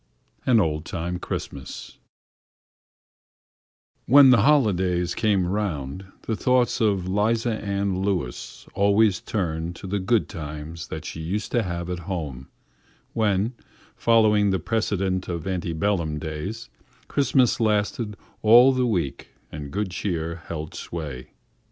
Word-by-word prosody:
AN 120 -3 +5
OLD 75 -5 0
TIME 90 +1 -4
CHRISTMAS 70 -6 -6 2.1
When 135 0 +8
the 120 -5 +6
holidays 95 -10 +2
came 105 -5 +2
round 90 -4 -3 0.2
the 110 - -1
thoughts 125 +2 +2
of 100 -5 +1
'Liza 110 +3 0
Ann 100 -2 -1
Lewis 95 -11 -3
always 100 0 +3
turned 85 -4 -2
to - - -10
the 100 +2 -1
good 100 +4 +1
times 80 +1 -7
that 80 0 -6
she 80 - -6
used 100 +6 -3
to 120 - +2
have 85 -4 -4
at 90 -1 -3
home 70 -8 -4 0.7
when, 105 +1 +1 0.4
following 110 -3 +4
the 95 - +2
precedent 95 -1 -1
of 85 -2 -4
anti 90 -3 -2
bellum 80 -2 0
days, 80 - -5 0.4
Christmas 130 -3 +2
lasted 105 0 0 0.2
all 120 +4 +8
the 130 -1 +1
week 85 - -2 0.2
and 75 -2 -6
good 100 +3 -2
cheer 85 -3 -3
held 80 -1 -5
sway. 70 -7 -6
95 Hz, 125 wpm, -24 LUFS, 85-110 Hz, 2.1 s, When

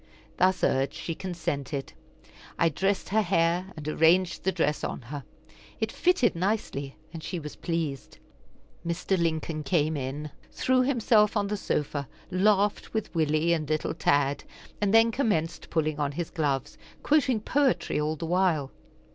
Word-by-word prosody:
Thus 185 0 +2
urged, 135 +1 +1
she 165 - -4
consented. 160 -6 -4 0.6
I 165 - +4
dressed 195 +5 -1
her 220 +3 +3
hair, 175 0 +1
and 150 -1 -7
arranged 170 +4 +3
the 190 - +2
dress 160 -4 0
on - - -3
her. 140 +4 -7 0.6
It - - -1
fitted 355 - +2
nicely, 170 -7 -2 0.2
and 165 - -6
she 180 - -4
was 150 -2 -7
pleased. 160 -6 -3 0.7
Mr. 170 +3 -1
Lincoln 160 -2 -1
came 155 +1 +1
in, 145 +2 -4 0.2
threw 260 0 +2
himself 230 -5 +3
on 205 - +1
the 210 - 0
sofa, 145 -7 -2 0.2
laughed 205 +3 +2
with 220 -1 -2
Willie 160 +1 +2
and 155 -3 -2
little 155 0 0
Tad, 145 -3 +1 0.4
and 205 -1 +2
then 225 +1 +6
commenced 190 - -1
pulling 155 -2 0
on 145 -1 0
his 170 +2 -4
gloves, 145 -5 -1 0.2
quoting 265 -6 +3
poetry 265 - +1
all 155 +1 0
the 160 - -5
while. 170 -5 +1
165 Hz, 150 wpm, -27 LUFS, 150-200 Hz, 0.7 s, then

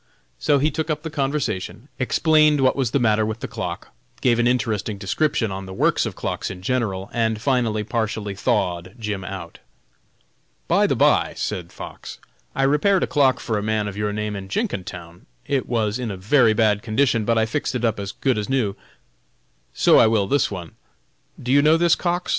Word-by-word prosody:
So 140 - +3
he 150 +3 +1
took 160 +3 -3
up 155 0 -2
the 160 - -5
conversation, 135 -6 -2
explained 155 +2 +3
what 130 -1 +3
was 135 -4 0
the 135 - +1
matter 110 -4 +2
with 110 +1 -3
the - - -3
clock, - - -5 0.3
gave 120 -2 +2
an 120 - +3
interesting 110 -4 -1
description 110 +3 0
on 95 0 -6
the 95 - -8
works - - +2
of - - -6
clocks - - -3
in 90 -1 -8
general, 105 -5 -2
and 110 -2 0
finally 115 -4 0
partially 110 -2 -2
thawed 95 -4 -1
Jim 105 -4 -4
out. 95 -4 -8 1.1
"By - - +3
the - - +1
by," - - +3
said 85 -2 -4
Fox, - - -9 0.4
"I - - +1
repaired 150 +8 +3
a - - 0
clock 135 -5 +3
for 110 -3 -2
a - - -3
man 110 0 -1
of 100 - -6
your 105 0 -1
name 105 0 -3
in 95 -1 -6
Jenkintown; 90 - -5 0.2
it 135 -2 -1
was 110 -1 0
in 120 -3 -3
a 100 - -5
very 110 +4 +4
bad 105 -2 +2
condition, 115 0 +1
but 115 +2 +1
I 110 - +3
fixed 130 +3 -2
it 120 -1 0
up 110 -2 0
as 100 -1 -4
good 130 +1 0
as 105 - -4
new; 120 -7 0 1.0
so - - +5
I - - +6
will 110 -3 +2
this 140 +5 +1
one. 90 -5 -7 0.7
Do 125 - -3
you 140 +1 +6
know 155 +2 +5
this 170 -1 +4
Cox? 175 0 -1
110 Hz, 200 wpm, -22 LUFS, 105-135 Hz, 1.1 s, I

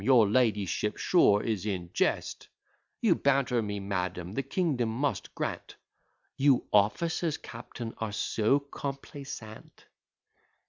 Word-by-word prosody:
your 125 -5 +6
ladyship 105 -2 +1
sure 105 - +4
is 110 -5 -1
in 95 -5 -3
jest; - - -1 0.5
You 220 -6 +5
banter 135 -5 +2
me, 105 -1 -3
madam; 90 -2 -3
the 135 - 0
kingdom 135 -4 0
must 120 -3 -2
grant - - -4 0.3
' - - -44
'You 135 -2 +4
officers, 155 - +2
captain, 115 -2 -8
are 110 -2 -2
so 110 +5 +1
complaisant!'" 140 -5 -8
115 Hz, 120 wpm, -29 LUFS, 105-140 Hz, 0.5 s, your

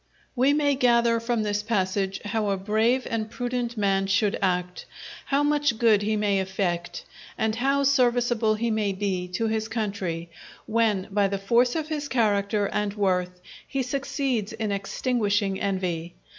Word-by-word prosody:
We 260 +3 +4
may 290 -1 +2
gather 235 -3 +3
from 230 -1 -1
this 205 -1 -1
passage 195 -2 -1
how 210 0 -1
a 195 - 0
brave 220 +6 +1
and 220 -1 -2
prudent 245 0 -3
man 195 -2 +1
should 205 +1 +2
act, 180 -1 -1 0.4
how 280 +1 +1
much 290 -5 +1
good 220 -3 +4
he 215 +1 0
may 205 -2 +1
effect, 185 -2 -3 0.3
and 220 0 0
how 275 +3 +2
serviceable 240 -4 +2
he 230 +2 -1
may 210 -2 0
be 190 -2 -2
to 225 - 0
his 220 0 -1
country, 195 -7 -3 0.3
when 215 -4 +1
by 200 0 +2
the 195 0 -2
force 235 +5 +2
of 315 -1 -2
his 300 -2 -3
character 205 -4 +1
and 205 0 -2
worth 180 -3 0 0.3
he 270 -1 -1
succeeds 260 -4 -2
in 220 -2 -3
extinguishing 200 -1 -1
envy. 180 -4 -2
215 Hz, 155 wpm, -25 LUFS, 195-240 Hz, 0.4 s, We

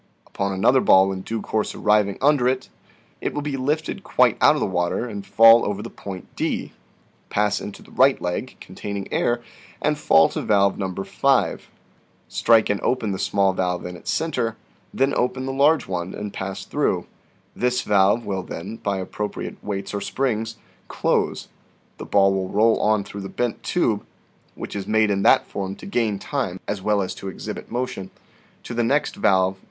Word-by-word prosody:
Upon 100 0 -3
another 115 +7 +3
ball 95 +1 +5
in 95 -1 -4
due 110 +3 -4
course 110 -1 -2
arriving 105 -2 +2
under 140 -3 +4
it, 130 0 -1 0.5
it - - -3
will 145 - -2
be 145 -2 -2
lifted 150 +4 -2
quite - - +3
out - - +6
of - - -1
the - - +1
water, 90 +6 -1
and 100 -3 -6
fall 115 +4 +7
over 105 0 -2
the - - -8
PERPETUAL 100 - -8
MOTION 90 - -12
59 - - -2
point - - -8
D, - - -27 0.6
pass 105 0 +1
into 100 - -8
the - - -18
right 135 +1 +4
leg 90 0 -4
(containing 100 -1 -6
air), 120 0 +1 0.4
and 150 -1 0
fall 80 - +5
to - - -4
valve 100 -2 +2
No. 95 -2 -2
5, 130 +7 0 0.6
strike 115 -3 +3
and 100 - -2
open 120 -5 0
the 95 - -3
small 100 -1 +2
valve 90 -1 -1
in 90 0 -6
its 85 - -9
center, 125 -9 -1 0.4
then 135 +1 +1
open 130 +1 -1
the 135 - -3
large 145 +4 +3
one, 90 -1 -4
and 105 -1 -6
pass 95 0 -5
through; - - 0 0.5
this 125 0 0
valve 100 +3 +3
will 95 -2 -2
then, 95 +5 -7
by 100 -3 -2
appropriate 105 +2 -5
weights 100 -1 -4
or 100 - -2
springs, 115 -2 -2 0.3
close; - - 0 0.5
the - - -6
ball 95 -1 +4
will 95 -1 -2
roll 110 +2 +3
on 105 -1 +2
through 100 +1 -8
the 95 - -6
bent 120 -2 -2
tube - - 0 0.5
(which - - -7
is 100 -1 -4
made 110 -1 +3
in 100 -1 0
that - - +5
form 95 -1 -5
to - - -12
gain 115 - 0
time 95 -6 -3
as 105 -2 -3
well 105 0 +1
as 95 - -4
to 95 - -8
exhibit 95 - -7
motion) 120 -6 -3 0.5
to - - -7
the 120 0 0
next 140 +6 +1
valve 95 -2 +2
(No. - - -28
105 Hz, 195 wpm, -23 LUFS, 95-120 Hz, 0.6 s, fall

